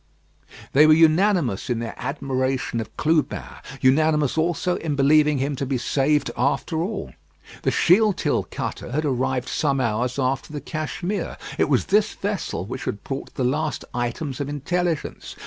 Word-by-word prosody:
They 150 +3 +7
were 155 - +7
unanimous 160 - +3
in 120 - +1
their 115 -1 -4
admiration 130 -3 -2
of 110 - -10
Clubin; 155 -1 +1 0.4
unanimous 150 +1 +3
also 175 +2 0
in 155 -3 -2
believing 150 +1 +4
him 140 +2 -1
to 140 - -2
be 130 -1 0
saved 140 +3 +1
after 145 +5 0
all. 190 +6 -4 0.5
The - - +1
Shealtiel 200 +2 +3
cutter 120 - -5
had 155 +2 0
arrived 130 -1 0
some 140 -3 0
hours 120 +1 0
after 135 +1 -1
the 150 - -4
Cashmere. 170 +7 -4 0.2
It - - +3
was - - +2
this 210 +2 +2
vessel 195 - -3
which 125 +5 -6
had 100 - -4
brought 135 0 -6
the 130 - -1
last 150 +3 -1
items 125 +3 -3
of 140 - -3
intelligence. 165 +3 -2
145 Hz, 155 wpm, -23 LUFS, 130-160 Hz, 0.5 s, They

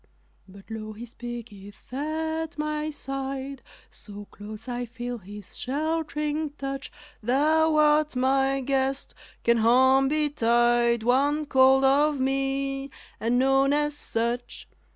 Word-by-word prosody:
But 195 +3 -15
lo, 215 -1 -6
He 225 +3 -8
speaketh 235 -3 -10
at 315 +3 -3
my 305 0 -2
side 275 -1 -5 0.3
So 205 -1 -11
close 215 +3 -10
I 245 0 -3
feel 240 0 -6
His 205 0 -12
shelt'ring 300 +1 -2
touch, 275 0 -5 0.3
"Thou 310 +7 +3
art 300 -1 +3
my 270 +1 +2
guest, 270 +1 -1 0.3
can 235 0 +4
harm 260 +4 +5
betide 240 -5 +2
_One 285 +6 +2
called 265 0 +5
of 285 +2 +3
me, 270 +1 -1 0.3
and 235 +2 +1
known 270 +2 +3
as 295 0 0
such? 240 -2 -3
270 Hz, 115 wpm, -26 LUFS, 240-295 Hz, 0.3 s, harm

